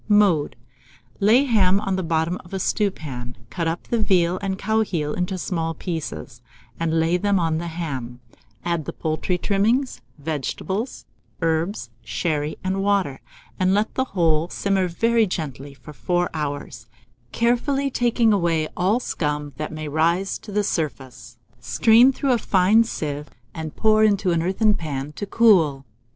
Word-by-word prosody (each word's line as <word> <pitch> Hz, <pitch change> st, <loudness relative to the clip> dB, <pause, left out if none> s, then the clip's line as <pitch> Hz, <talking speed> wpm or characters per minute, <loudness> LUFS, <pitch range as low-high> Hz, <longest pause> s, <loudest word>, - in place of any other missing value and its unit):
Mode. 200 Hz, -8 st, +3 dB, 0.6 s
Lay 220 Hz, +6 st, +5 dB
the 280 Hz, -3 st, -2 dB
ham 195 Hz, -3 st, +4 dB
on 195 Hz, -2 st, -1 dB
the 185 Hz, -, -1 dB
bottom 165 Hz, +1 st, 0 dB
of 175 Hz, +2 st, -8 dB
a -, -, -2 dB
stewpan, 150 Hz, -, -2 dB, 0.2 s
cut 170 Hz, -3 st, -2 dB
up 165 Hz, +1 st, -2 dB
the 235 Hz, -, -1 dB
veal 180 Hz, -3 st, +2 dB
and 195 Hz, -1 st, -2 dB
cow 220 Hz, +3 st, +1 dB
heel 160 Hz, -8 st, -2 dB
into 180 Hz, +1 st, -2 dB
small 165 Hz, -3 st, -2 dB
pieces, 155 Hz, -8 st, -5 dB, 0.4 s
and 165 Hz, -1 st, +1 dB
lay 165 Hz, +2 st, +2 dB
them 200 Hz, +1 st, +1 dB
on 160 Hz, -2 st, 0 dB
the 170 Hz, -, -4 dB
ham; 135 Hz, -8 st, -5 dB, 0.5 s
add 170 Hz, -3 st, -1 dB
the -, -, -5 dB
poultry 160 Hz, +3 st, -1 dB
trimmings, 220 Hz, +8 st, +1 dB, 0.2 s
vegetables, 160 Hz, -, -4 dB, 0.4 s
herbs, 165 Hz, -, -1 dB
sherry, 150 Hz, +5 st, -2 dB
and 190 Hz, +1 st, -1 dB
water, 195 Hz, -9 st, 0 dB, 0.4 s
and 185 Hz, +1 st, +3 dB
let 210 Hz, +2 st, 0 dB
the 260 Hz, -, 0 dB
whole 165 Hz, -1 st, +2 dB
simmer 195 Hz, -2 st, 0 dB
very 230 Hz, +5 st, +2 dB
gently 145 Hz, -5 st, -5 dB
for 140 Hz, +3 st, -12 dB
4 175 Hz, +9 st, -1 dB
hours, 145 Hz, -6 st, -5 dB, 0.4 s
carefully 270 Hz, +4 st, +1 dB
taking 235 Hz, -2 st, +2 dB
away 170 Hz, -5 st, +1 dB
all 195 Hz, +6 st, +2 dB
scum 150 Hz, -, -3 dB
that 155 Hz, +1 st, -4 dB
may 155 Hz, -1 st, -5 dB
rise 170 Hz, +6 st, +1 dB
to 210 Hz, -, -11 dB
the 205 Hz, +1 st, +1 dB
surface; 130 Hz, -, -4 dB, 0.2 s
strain 220 Hz, -, +5 dB
through 270 Hz, 0 st, -1 dB
a 240 Hz, -, +3 dB
fine 200 Hz, +4 st, +4 dB
sieve, 150 Hz, -9 st, -4 dB, 0.2 s
and 160 Hz, -1 st, -6 dB
pour 215 Hz, 0 st, +4 dB
into 200 Hz, -3 st, +3 dB
an 170 Hz, -1 st, +1 dB
earthen 195 Hz, +5 st, +2 dB
pan 145 Hz, -5 st, -4 dB
to 205 Hz, -, -5 dB
get -, -, -30 dB
cold. 165 Hz, -12 st, +4 dB
175 Hz, 160 wpm, -23 LUFS, 155-205 Hz, 0.6 s, Lay